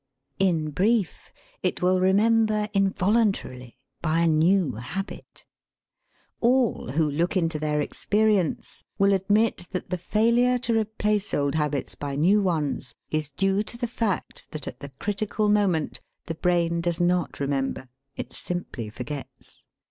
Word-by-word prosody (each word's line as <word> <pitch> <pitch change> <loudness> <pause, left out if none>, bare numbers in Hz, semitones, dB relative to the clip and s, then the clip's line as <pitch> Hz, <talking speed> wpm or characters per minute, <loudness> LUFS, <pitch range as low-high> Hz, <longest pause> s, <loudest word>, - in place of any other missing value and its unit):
In 165 -5 +1
brief, 205 +3 0 0.3
it - - -1
will 185 +1 +3
remember 215 +2 +3
involuntarily, 195 - 0 0.2
by 165 0 +1
a 170 - +3
new 165 +1 +3
habit. 140 - -7 0.9
All 240 - +2
who 160 +1 +2
look 165 +6 0
into 165 -3 0
their 150 0 0
experience 205 +1 0
will 200 -1 +4
admit 205 0 +1
that 180 -1 -4
the 180 - -1
failure 235 +6 +3
to 235 -1 0
replace 210 -1 -1
old 140 -1 0
habits 150 -4 -1
by 140 -1 -4
new 185 +8 +4
ones 155 -8 -1 0.2
is 155 -2 -1
due 195 +7 +1
to 225 +2 -6
the 240 - -2
fact 225 -4 -3
that 150 -3 -6
at 125 - -7
the 140 - -8
critical 205 +8 -2
moment 195 -7 +1 0.2
the 165 - -3
brain 170 0 +1
does 170 0 -1
not 175 0 +1
remember; 135 -2 -2 0.3
it - - -6
simply 175 -11 -4
forgets. 135 +6 -9
180 Hz, 140 wpm, -25 LUFS, 155-210 Hz, 0.9 s, will